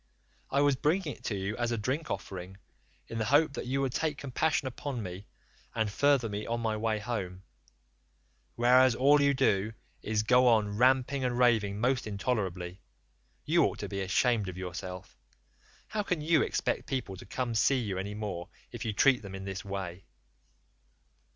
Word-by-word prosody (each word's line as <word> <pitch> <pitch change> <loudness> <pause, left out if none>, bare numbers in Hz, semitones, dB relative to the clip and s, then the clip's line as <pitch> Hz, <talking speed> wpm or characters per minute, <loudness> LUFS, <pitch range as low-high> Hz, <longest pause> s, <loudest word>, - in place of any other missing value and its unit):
I 140 - +2
was 145 -1 +4
bringing 155 +3 0
it - - -21
to 105 - -1
you 100 +2 -3
as 120 0 -1
a 115 - 0
drink 130 +9 -2
offering, 95 0 -6 0.5
in 115 - -5
the 110 - 0
hope 145 +4 +4
that 125 - -5
you 135 +2 0
would 135 -2 0
take 155 -1 -1
compassion 140 +1 0
upon 130 -2 -4
me 90 +2 -7 0.5
and 110 -2 0
further 140 0 +3
me 105 0 -4
on 115 0 -1
my 110 -2 -1
way 110 0 0
home, 100 -5 -4 1.1
whereas 125 +1 +5
all 145 +3 +5
you 140 0 +3
do 110 -5 +1 0.3
is 105 0 0
to - - -14
go 125 +2 +5
on 105 -3 +3
ramping 130 +2 +3
and 125 -1 0
raving 110 -5 +3
most 125 +1 +1
intolerably. 95 -4 -2 0.6
You - - +4
ought - - -2
to - - -5
be 100 - -3
ashamed 105 +2 +1
of 90 - -8
yourself; 90 0 -7 0.7
how 215 - -1
can 180 -5 -1
you 155 0 +3
expect - - -1
people 125 -8 -3
to - - -11
come 125 +2 -2
see 130 +5 +3
you 100 -7 -2
any 100 +2 -4
more 100 -5 -5 0.2
if - - -6
you 110 - -2
treat 130 +3 +4
them 100 -2 -8
in 95 0 -7
this 95 0 -5
way? 95 -2 -5
115 Hz, 185 wpm, -30 LUFS, 100-130 Hz, 1.1 s, whereas